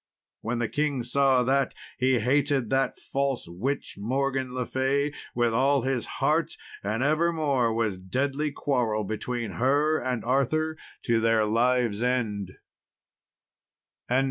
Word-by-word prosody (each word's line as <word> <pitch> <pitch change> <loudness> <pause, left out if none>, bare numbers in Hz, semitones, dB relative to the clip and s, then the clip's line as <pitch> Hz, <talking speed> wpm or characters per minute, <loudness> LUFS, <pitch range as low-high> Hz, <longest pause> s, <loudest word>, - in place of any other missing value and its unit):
When 115 +2 -2
the 120 -1 0
king 145 -1 -1
saw 130 +1 +3
that, 135 +2 +1 0.2
he 130 0 +3
hated 135 +1 +1
that 135 0 +1
false 140 -5 -2
witch 110 +9 -4
Morgan 130 +3 -1
le 125 -1 -2
Fay 140 +3 0 0.2
with 120 -1 +2
all 135 +2 +3
his 130 -3 -1
heart, - - +1 0.3
and 110 +5 -1
evermore 150 -5 +2
was 110 -4 -1
deadly 140 +10 -1
quarrel 120 -7 0
between 110 +1 -3
her 145 +4 +3
and 125 -2 -3
Arthur 155 +5 +1 0.3
to 115 -2 +2
their 115 -1 +3
lives' 115 0 +1
end. 110 -7 -1
125 Hz, 125 wpm, -27 LUFS, 115-140 Hz, 0.3 s, saw